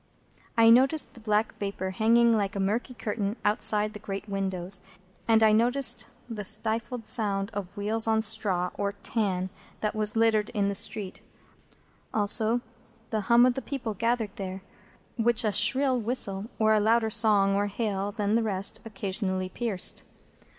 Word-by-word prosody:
I 225 Hz, 0 st, +6 dB
noticed 270 Hz, +6 st, +3 dB
the -, -, -13 dB
black 215 Hz, 0 st, 0 dB
vapour 195 Hz, -2 st, -4 dB
hanging 230 Hz, +4 st, +3 dB
like 200 Hz, -2 st, -2 dB
a -, -, -3 dB
murky 220 Hz, +6 st, -2 dB
curtain 210 Hz, -2 st, -3 dB
outside 210 Hz, 0 st, +1 dB
the 210 Hz, -, -8 dB
great 200 Hz, 0 st, -6 dB
windows, 190 Hz, -2 st, -1 dB, 0.5 s
and 225 Hz, -1 st, +4 dB
I 215 Hz, -, +5 dB
noticed 240 Hz, +1 st, +1 dB, 0.2 s
the 220 Hz, -3 st, -6 dB
stifled 225 Hz, +3 st, -2 dB
sound 200 Hz, -2 st, -2 dB
of 200 Hz, 0 st, -7 dB
wheels 220 Hz, +2 st, 0 dB
on 220 Hz, -, +2 dB
the -, -, +1 dB
straw 205 Hz, -5 st, +1 dB
or 200 Hz, 0 st, -1 dB
tan 200 Hz, -3 st, -2 dB, 0.3 s
that 210 Hz, -, -1 dB
was 215 Hz, 0 st, 0 dB
littered 225 Hz, -2 st, +2 dB
in 200 Hz, -1 st, +1 dB
the -, -, -2 dB
street; 200 Hz, 0 st, -1 dB, 0.9 s
also, 220 Hz, +3 st, +5 dB, 0.5 s
the 220 Hz, -1 st, -1 dB
hum 235 Hz, +1 st, +6 dB
of 250 Hz, -, +3 dB
the 265 Hz, -, -5 dB
people 250 Hz, -7 st, -5 dB
gathered 230 Hz, 0 st, -2 dB
there, 190 Hz, -1 st, -6 dB, 0.5 s
which 235 Hz, 0 st, +3 dB
a 215 Hz, -, +1 dB
shrill 255 Hz, +5 st, +2 dB
whistle, 215 Hz, -4 st, -1 dB
or 220 Hz, -1 st, +3 dB
a 215 Hz, -, +3 dB
louder 220 Hz, +1 st, +2 dB
song 205 Hz, -3 st, +5 dB
or 205 Hz, +1 st, 0 dB
hail 205 Hz, -1 st, -3 dB
than 205 Hz, -1 st, -2 dB
the 230 Hz, -, +2 dB
rest, 200 Hz, -3 st, -1 dB
occasionally 190 Hz, -3 st, -4 dB
pierced. 210 Hz, -4 st, -1 dB
215 Hz, 165 wpm, -27 LUFS, 200-230 Hz, 0.9 s, I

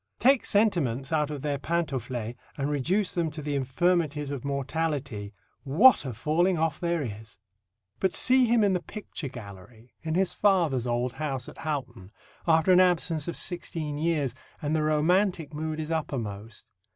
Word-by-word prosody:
Take 265 Hz, +2 st, +4 dB
sentiments 165 Hz, -, +1 dB
out 150 Hz, -2 st, +1 dB
of 145 Hz, -2 st, -6 dB
their 145 Hz, -2 st, -1 dB
pantaufles, 130 Hz, -8 st, -2 dB, 0.2 s
and 140 Hz, +1 st, -1 dB
reduce 180 Hz, +8 st, 0 dB
them 170 Hz, -2 st, 0 dB
to 155 Hz, +1 st, -9 dB
the 145 Hz, 0 st, -2 dB
infirmities 150 Hz, +1 st, 0 dB
of 140 Hz, -4 st, -5 dB
mortality, 140 Hz, -6 st, -2 dB, 0.3 s
what 160 Hz, -, +6 dB
a 130 Hz, -, -3 dB
falling 170 Hz, -, +1 dB
off 160 Hz, -1 st, 0 dB
there 170 Hz, -3 st, 0 dB
is!" 110 Hz, -3 st, -8 dB, 0.6 s
But 190 Hz, -1 st, +1 dB
see 255 Hz, 0 st, +4 dB
him 230 Hz, -1 st, +4 dB
in 200 Hz, -2 st, +3 dB
the 180 Hz, -, 0 dB
picture 190 Hz, -7 st, -7 dB
gallery 110 Hz, 0 st, -12 dB
in 160 Hz, 0 st, -2 dB
his 190 Hz, 0 st, +1 dB
father's 165 Hz, -, +2 dB
old 120 Hz, +1 st, 0 dB
house 135 Hz, -3 st, -4 dB
at -, -, -11 dB
Houghton, 135 Hz, -11 st, -4 dB, 0.4 s
after 160 Hz, +2 st, +4 dB
an 180 Hz, -, +7 dB
absence 170 Hz, -4 st, +2 dB
of 170 Hz, -, -4 dB
sixteen 160 Hz, -4 st, -2 dB
years, 155 Hz, -6 st, 0 dB, 0.3 s
and 150 Hz, +1 st, -1 dB
the 155 Hz, -, +1 dB
romantic 160 Hz, +2 st, +1 dB
mood 155 Hz, +1 st, -3 dB
is 155 Hz, +1 st, -4 dB
upper 155 Hz, -4 st, -1 dB
most. 105 Hz, -1 st, -7 dB
150 Hz, 165 wpm, -27 LUFS, 130-170 Hz, 0.6 s, an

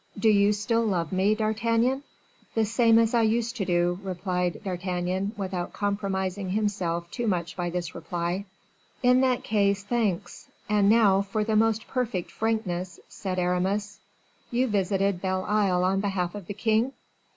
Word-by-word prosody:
Do 220 Hz, +2 st, +3 dB
you 205 Hz, -1 st, +5 dB
still 230 Hz, +3 st, 0 dB
love 180 Hz, -7 st, -1 dB
me, 195 Hz, +3 st, +2 dB
D'Artagnan?" 230 Hz, +4 st, +1 dB, 0.5 s
"The 225 Hz, -1 st, +3 dB
same 225 Hz, +1 st, +4 dB
as 230 Hz, 0 st, +3 dB
I 235 Hz, -, +4 dB
used 230 Hz, +2 st, +1 dB
to 195 Hz, -, -1 dB
do," 175 Hz, 0 st, +1 dB
replied 180 Hz, -2 st, -2 dB
D'Artagnan, 185 Hz, +1 st, -2 dB
without 185 Hz, -3 st, -3 dB
compromising 195 Hz, -2 st, -2 dB
himself 185 Hz, -5 st, -1 dB
too 240 Hz, -2 st, -3 dB
much 170 Hz, -4 st, -1 dB
by 175 Hz, -1 st, -2 dB
this 175 Hz, 0 st, -4 dB
reply. 175 Hz, +3 st, -3 dB, 0.6 s
"In 250 Hz, +1 st, +5 dB
that 255 Hz, -2 st, +1 dB
case, 200 Hz, -2 st, +1 dB
thanks; 210 Hz, -5 st, -2 dB, 0.2 s
and 205 Hz, -1 st, +3 dB
now, 205 Hz, -3 st, +5 dB
for 200 Hz, +2 st, -2 dB
the 220 Hz, 0 st, 0 dB
most 225 Hz, 0 st, +2 dB
perfect 235 Hz, -9 st, -2 dB
frankness," 190 Hz, -5 st, -2 dB
said 185 Hz, -2 st, -5 dB
Aramis; 190 Hz, +3 st, -1 dB, 0.5 s
"you 250 Hz, +2 st, +1 dB
visited 195 Hz, -3 st, 0 dB
Belle 185 Hz, 0 st, -1 dB
Isle 195 Hz, -4 st, +2 dB
on 190 Hz, +1 st, +2 dB
behalf 190 Hz, -3 st, -1 dB
of 205 Hz, -4 st, -8 dB
the 205 Hz, -, -5 dB
king?" 225 Hz, +5 st, +1 dB
200 Hz, 155 wpm, -26 LUFS, 180-220 Hz, 0.6 s, you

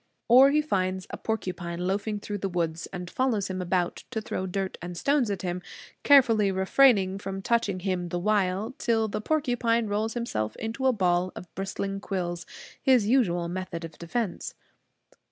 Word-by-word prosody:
Or 255 Hz, +3 st, +8 dB
he 300 Hz, +2 st, +2 dB
finds 185 Hz, -8 st, -1 dB
a -, -, -5 dB
porcupine 180 Hz, -5 st, -3 dB
loafing 205 Hz, +2 st, -1 dB
through 205 Hz, 0 st, -4 dB
the 195 Hz, -, -2 dB
woods, 165 Hz, -2 st, -2 dB
and 180 Hz, -1 st, -6 dB
follows 220 Hz, -2 st, 0 dB
him 185 Hz, 0 st, -3 dB
about 180 Hz, -1 st, 0 dB
to 230 Hz, -, -2 dB
throw 190 Hz, -3 st, -4 dB
dirt 190 Hz, +1 st, -3 dB
and 175 Hz, 0 st, -6 dB
stones 280 Hz, +2 st, +2 dB
at 195 Hz, -2 st, -3 dB
him, 180 Hz, 0 st, -2 dB, 0.4 s
carefully 230 Hz, -8 st, +5 dB
refraining 190 Hz, 0 st, +4 dB
from 195 Hz, -1 st, -5 dB
touching 205 Hz, -5 st, +1 dB
him 180 Hz, -2 st, -2 dB
the 175 Hz, -, -2 dB
while, 200 Hz, +3 st, 0 dB
till 225 Hz, -1 st, +1 dB
the 210 Hz, -, -3 dB
porcupine 245 Hz, -5 st, +1 dB
rolls 215 Hz, +2 st, -1 dB
himself 110 Hz, -, -2 dB
into 230 Hz, +4 st, -2 dB
a -, -, +6 dB
ball 180 Hz, -4 st, +1 dB
of 180 Hz, -, -10 dB
bristling 195 Hz, 0 st, -3 dB
quills, 175 Hz, -4 st, -3 dB, 0.3 s
his 255 Hz, -5 st, +4 dB
usual 195 Hz, -8 st, +2 dB
method 175 Hz, -1 st, -5 dB
of 165 Hz, -, -12 dB
defense. 180 Hz, +3 st, -3 dB
195 Hz, 170 wpm, -27 LUFS, 180-230 Hz, 0.4 s, Or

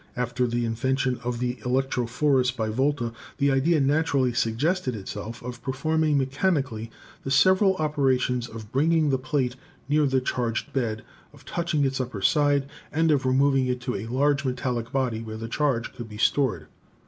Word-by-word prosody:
After 125 Hz, 0 st, 0 dB
the 120 Hz, 0 st, -1 dB
invention 130 Hz, +3 st, 0 dB
of 120 Hz, 0 st, -2 dB
the 125 Hz, +1 st, -2 dB
electrophorus 125 Hz, +2 st, +1 dB
by 115 Hz, -3 st, -2 dB
Volta, 125 Hz, 0 st, 0 dB, 0.2 s
the 140 Hz, -1 st, +2 dB
idea 150 Hz, +5 st, +3 dB
naturally 140 Hz, -3 st, +2 dB
suggested 125 Hz, +5 st, 0 dB
itself 105 Hz, +3 st, -7 dB
of 125 Hz, -1 st, -7 dB
performing 155 Hz, +3 st, +1 dB
mechanically 135 Hz, -, 0 dB, 0.3 s
the -, -, -4 dB
several 185 Hz, +8 st, +4 dB
operations 130 Hz, -6 st, +1 dB
of 110 Hz, -1 st, -10 dB
bringing 155 Hz, +2 st, +2 dB
the 130 Hz, -, +1 dB
plate 130 Hz, -2 st, -1 dB, 0.3 s
near 150 Hz, +1 st, +3 dB
the 135 Hz, -1 st, +2 dB
charged 120 Hz, -3 st, -2 dB
bed, 110 Hz, -5 st, -1 dB, 0.3 s
of -, -, -18 dB
touching 165 Hz, -4 st, 0 dB
its 130 Hz, -1 st, 0 dB
upper 120 Hz, -6 st, -5 dB
side, 145 Hz, -1 st, +3 dB, 0.2 s
and 160 Hz, +1 st, +2 dB
of 140 Hz, -3 st, +2 dB
removing 135 Hz, 0 st, +3 dB
it 125 Hz, 0 st, -1 dB
to 125 Hz, -, -3 dB
a. 100 Hz, +3 st, -4 dB
large 140 Hz, +3 st, +1 dB
metallic 125 Hz, -3 st, -2 dB
body 125 Hz, -5 st, -1 dB
where 110 Hz, -1 st, -6 dB
the 115 Hz, +1 st, -5 dB
charge 125 Hz, -2 st, -1 dB
could 120 Hz, -2 st, -8 dB
be 105 Hz, -, -9 dB
stored. 115 Hz, -, +1 dB
130 Hz, 165 wpm, -25 LUFS, 120-145 Hz, 0.3 s, several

